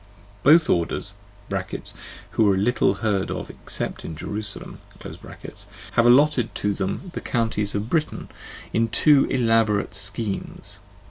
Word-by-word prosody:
Both 155 +3 +6
orders 85 +3 0 1.2
(who 105 -3 +3
are 95 - +2
little 120 +6 +2
heard 100 -3 +1
of - - -5
except - - -3
in 80 - -6
"Jerusalem") 105 +5 -5 0.2
have 115 - -5
allotted 130 -1 +4
to 105 0 0
them 100 - -4
the - - -4
counties 110 -4 -1
of 105 +2 -2
Britain 155 +4 -1 0.5
in 115 0 +2
two 140 +5 +5
elaborate 115 -5 +2
schemes, 100 +1 -2
(pp. - - -26
110 Hz, 125 wpm, -23 LUFS, 100-125 Hz, 1.2 s, Both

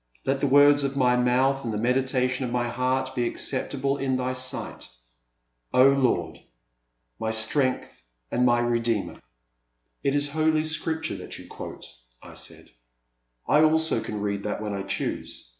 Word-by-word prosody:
I^t 135 0 +1
the 140 - +1
words 145 +1 +6
of 140 0 -2
my 125 -2 +4
mouth 130 +2 +2
and 115 - -3
the 105 - -2
meditation 125 +2 +1
of 125 - -2
my 120 0 -1
heart 130 +2 -1
be 120 -2 0
acceptable 135 +2 -2
in 135 -1 0
Thy 130 0 -1
sight, 130 - -4 0.4
— - - -45
O 130 +2 +7
Lord! 135 -3 +1 0.8
My 110 - -2
strength 110 - 0 0.3
and 125 - +1
my 120 -1 +4
Redeemer! 115 -3 -1 0.4
' - - -48
It 140 0 +1
is 145 0 +1
Holy 155 0 +2
Scripture 160 +1 -2
that - - -8
you - - -11
quote," - - -9 0.3
I - - -13
said; - - -8 0.8
I 150 - +5
also 160 +1 +3
can 105 -1 -5
read 100 -1 -2
that 105 0 -3
when 105 -1 -4
I 100 - -3
choose. 95 -9 -4
130 Hz, 165 wpm, -25 LUFS, 115-140 Hz, 0.8 s, O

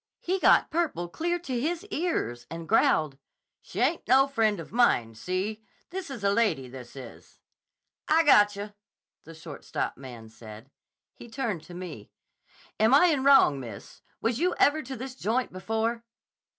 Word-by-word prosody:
He 375 +2 -2
got - - +4
purple 310 - -1
clear 345 - -2
to 265 -8 -4
his 340 +6 -2
ears, 120 - -2
and 165 +1 -7
growled, 150 -3 +2 0.4
'She - - -8
ain't 335 - 0
no 265 +2 +6
friend 220 -7 +1
of 165 - -9
mine. 125 - +2
See? 185 - -4 0.3
This 370 -2 -5
is 250 -7 -7
a 200 - +3
lady, 185 - +1
this 125 0 -11
is.' 130 -4 -12 0.7
'I 320 +2 +4
gotcha,' 205 -6 +3 0.5
the 165 - -12
shortstop 160 -2 -5
man 120 -4 -10
said. 110 +3 -13 0.4
He 235 - -13
turned 225 - -3
to 175 - -11
me. 170 - -8 0.7
'Am 220 +5 +5
I 355 +5 +6
in 285 -5 0
wrong, 270 - +5
miss? 115 -6 -10 0.2
Was 230 +2 0
you 355 +2 +1
ever 305 +2 +3
to 265 -1 -7
this 260 +2 -7
joint 250 -1 -2
before? 225 +4 -2
215 Hz, 160 wpm, -27 LUFS, -, 0.7 s, no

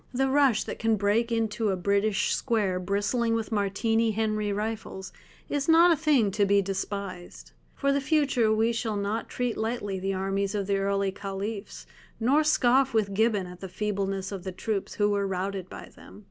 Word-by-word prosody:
The 270 +1 +2
rush 275 -5 +3
that - - -7
can 225 -1 +2
break 215 +4 +1
into 225 -1 0
a 190 - +1
British 200 +2 +1
square 205 -7 0
bristling 205 +5 0
with 225 0 -3
Martini 225 +2 +1
Henry 215 -1 -1
rifles 210 -2 -4 0.3
is 290 +1 -2
not 335 +2 +7
a - - +5
thing 285 -10 +2
to 205 +1 +1
be 200 0 +4
despised. 190 - -5 0.2
For 280 - +1
the 280 - +1
future 275 -6 +2
we 220 +2 +2
shall 225 -2 -2
not 205 +3 -2
treat 245 -2 -2
lightly 220 -4 -2
the 195 +1 -2
armies 195 +1 -1
of 200 -1 -1
the 200 0 0
early 195 0 0
Caliphs, 195 +2 -6 0.3
nor 270 +7 +3
scoff 265 -3 +3
with 205 -3 +1
Gibbon 210 -2 +1
at 180 0 -10
the 190 - -7
feebleness 195 -1 -2
of 195 -3 -6
the 190 - -4
troops 200 +2 -3
who 205 0 +2
were 200 -1 0
routed 190 0 -3
by - - -10
them. - - -14
210 Hz, 185 wpm, -27 LUFS, 195-230 Hz, 0.3 s, not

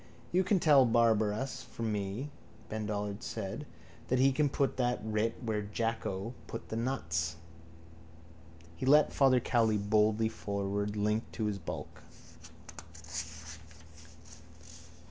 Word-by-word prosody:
—You 185 +2 +3
can 195 0 +2
tell 145 -5 +6
Barabbas 115 +1 +2
from 115 -1 -4
me, 105 +7 -3 0.4
Ben 110 -1 -3
Dollard 105 -1 -3
said, - - -5 0.4
that 130 - +2
he 135 +2 +5
can 145 +2 +2
put 140 -1 0
that 125 -1 +1
writ 110 +1 0
where 110 -2 -1
Jacko 110 0 -2
put 115 - -7
the - - -3
nuts. 85 -10 -1 1.4
He 105 - -4
led 150 +2 +6
Father 130 -2 +5
Cowley 115 -3 +2
boldly 105 +2 +3
forward, 100 -1 -2
linked 105 +2 0
to 110 - -2
his 105 -2 -1
bulk. 85 - -7
110 Hz, 120 wpm, -32 LUFS, 105-130 Hz, 1.4 s, tell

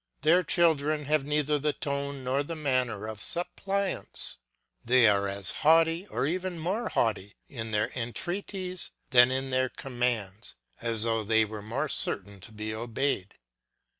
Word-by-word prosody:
Their 165 +4 +5
children 155 -4 +2
have 150 -1 +1
neither 150 0 +1
the 150 +1 0
tone 140 -2 -3
nor 130 +2 0
the 165 +3 -5
manner 130 -8 0
of 110 -2 -6
suppliants; 190 +3 -1 0.4
they 125 -1 +5
are 100 -1 +3
as 100 -1 +1
haughty 165 +4 +4
or - - -2
even 180 +3 -2
more 195 +8 -2
haughty 105 -3 -1
in 115 -4 -6
their 105 -1 0
entreaties 180 - -3 0.2
than 120 -1 +7
in 130 +1 -1
their 130 0 +1
commands, 120 -6 -2 0.2
as 115 -2 +2
though 115 -1 +2
they 110 +1 +3
were 105 0 -7
more 120 +8 -2
certain 100 -6 0
to 105 +5 -11
be 110 0 -5
obeyed. 115 -2 -2
130 Hz, 150 wpm, -28 LUFS, 110-155 Hz, 0.4 s, than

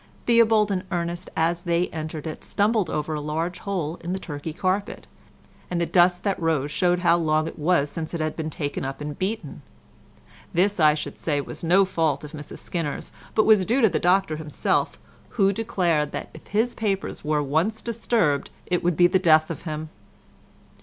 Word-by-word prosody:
Theobald 225 -3 +4
and 185 -2 -1
Ernest 175 0 -3
as 170 +1 +1
they 175 0 +1
entered 155 -1 -5
it, 155 - -6
stumbled 205 -3 +1
over 155 +1 -2
a 150 - -2
large 160 +4 -3
hole 175 -5 -3
in 175 +2 -2
the 190 - -2
Turkey 150 -2 -6
carpet, 185 +5 -2 0.6
and 175 - -1
the 170 - +1
dust 180 0 +3
that 195 -3 -1
rose 155 -3 0
showed 180 +1 +1
how 175 -1 +4
long 155 -1 +1
it - - -8
was 150 -2 +2
since 165 0 -4
it - - -3
had 155 -1 -1
been 160 -1 -3
taken 145 -2 -4
up 135 0 -4
and 150 -1 -6
beaten. 190 -6 -3 0.9
This, 195 +3 +2
I 155 -1 +6
should 150 - -6
say, 145 -3 0
was 140 - -7
no 185 +4 +5
fault 160 -6 0
of 150 - -8
Mrs 150 -2 -8
Skinner's 165 -5 -4 0.2
but 215 - +4
was 215 -3 +6
due 240 +8 +1
to 225 - +6
the - - 0
Doctor 180 -2 +2
himself, 150 -1 -1 0.4
who 195 -2 +4
declared 175 -8 0
that - - -5
if - - -13
his 225 +4 +1
papers 200 -3 -2
were 150 -1 +1
once 165 +11 0
disturbed 225 -10 0 0.2
it 180 -1 -1
would 175 -2 +1
be 175 - +6
the 185 +2 +4
death 155 -3 +4
of 165 - -6
him. 155 0 -5
170 Hz, 195 wpm, -24 LUFS, 155-190 Hz, 0.9 s, I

